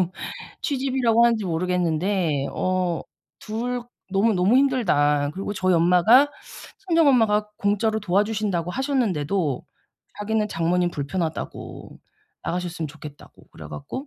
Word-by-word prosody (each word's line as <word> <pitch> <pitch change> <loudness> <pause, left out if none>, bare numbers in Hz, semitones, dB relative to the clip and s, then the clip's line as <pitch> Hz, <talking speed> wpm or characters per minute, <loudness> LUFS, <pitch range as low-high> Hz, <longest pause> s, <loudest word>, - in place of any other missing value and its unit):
지금 180 -1 0 0.5
취집이라고 260 -4 +2
하는지 230 -3 +2
모르겠는데 175 -3 0
어 185 -2 -1 0.4
2 240 +3 -3 0.3
너무너무 200 +2 +3
힘들다." 150 - +2
그리고 195 +2 -4
저희 185 -2 +1
엄마가 180 - +5 0.6
친정 330 -3 +4
엄마가 215 -5 +3
공짜로 210 +2 +1
도와 200 +1 +2
주신다고 200 -6 -2
하셨는데도 195 - -1 0.6
자기는 215 0 0
장모님 175 +1 0
불편하다고 160 +3 -5 0.4
나가셨으면 175 -2 -3
좋겠다고 145 -1 -13
그래 - - -11
갖고 260 - -7
195 Hz, 315 characters per minute, -23 LUFS, 170-225 Hz, 0.6 s, 엄마가